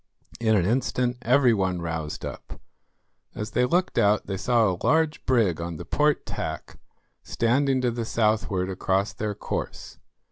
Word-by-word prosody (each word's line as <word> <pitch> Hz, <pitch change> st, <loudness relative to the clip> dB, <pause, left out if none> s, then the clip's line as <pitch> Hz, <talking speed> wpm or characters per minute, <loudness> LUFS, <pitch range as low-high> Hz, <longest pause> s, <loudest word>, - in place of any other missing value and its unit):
In 110 Hz, -2 st, +3 dB
an 90 Hz, -4 st, +2 dB
instant 125 Hz, +2 st, 0 dB
every 125 Hz, +1 st, +4 dB
one 95 Hz, -4 st, 0 dB
roused 80 Hz, -2 st, -4 dB
up. -, -, -8 dB, 0.8 s
As 105 Hz, +2 st, -5 dB
they 125 Hz, -, +2 dB
looked 180 Hz, +7 st, +1 dB
out 105 Hz, +1 st, +3 dB
they 95 Hz, -, -3 dB
saw 115 Hz, +2 st, +2 dB
a 90 Hz, -, -6 dB
large 160 Hz, -1 st, +2 dB
brig 110 Hz, -11 st, +2 dB
on 85 Hz, -1 st, -5 dB
the -, -, -8 dB
port 150 Hz, -1 st, +1 dB
tack, -, -, -6 dB, 0.4 s
standing 130 Hz, +3 st, +1 dB
to 125 Hz, -1 st, +1 dB
the 115 Hz, 0 st, -3 dB
southward 105 Hz, -4 st, 0 dB
across 95 Hz, +2 st, 0 dB
their 105 Hz, -1 st, -3 dB
course. -, -, -5 dB
110 Hz, 155 wpm, -25 LUFS, 95-125 Hz, 0.8 s, every